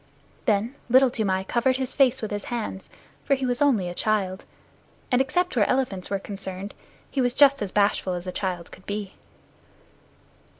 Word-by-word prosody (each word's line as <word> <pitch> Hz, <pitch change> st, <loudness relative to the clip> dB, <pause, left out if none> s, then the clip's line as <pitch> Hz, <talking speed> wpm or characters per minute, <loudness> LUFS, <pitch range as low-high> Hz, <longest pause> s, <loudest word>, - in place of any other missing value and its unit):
Then 215 Hz, +4 st, +1 dB, 0.2 s
Little 260 Hz, +1 st, +6 dB
Toomai 190 Hz, -5 st, 0 dB
covered 245 Hz, +6 st, +1 dB
his 260 Hz, -1 st, -2 dB
face 265 Hz, -3 st, +3 dB
with 215 Hz, -, -3 dB
his 205 Hz, 0 st, -3 dB
hands, 225 Hz, -5 st, -4 dB, 0.3 s
for 275 Hz, -, +2 dB
he 265 Hz, -1 st, -3 dB
was 245 Hz, +1 st, -1 dB
only 240 Hz, -11 st, +3 dB
a 175 Hz, -, -4 dB
child, 195 Hz, -1 st, -1 dB, 0.7 s
and 250 Hz, +1 st, +4 dB
except 355 Hz, +5 st, 0 dB
where 215 Hz, -4 st, +3 dB
elephants 250 Hz, -9 st, 0 dB
were 200 Hz, -, 0 dB
concerned, 195 Hz, 0 st, -6 dB, 0.4 s
he 275 Hz, -, 0 dB
was 245 Hz, -1 st, +1 dB
just 280 Hz, -2 st, +6 dB
as 200 Hz, -3 st, -2 dB
bashful 200 Hz, -2 st, +2 dB
as 175 Hz, 0 st, -5 dB
a 185 Hz, -, -3 dB
child 180 Hz, -2 st, -3 dB
could 185 Hz, -, -15 dB
be. 205 Hz, -1 st, -4 dB
215 Hz, 175 wpm, -25 LUFS, 190-260 Hz, 0.7 s, Little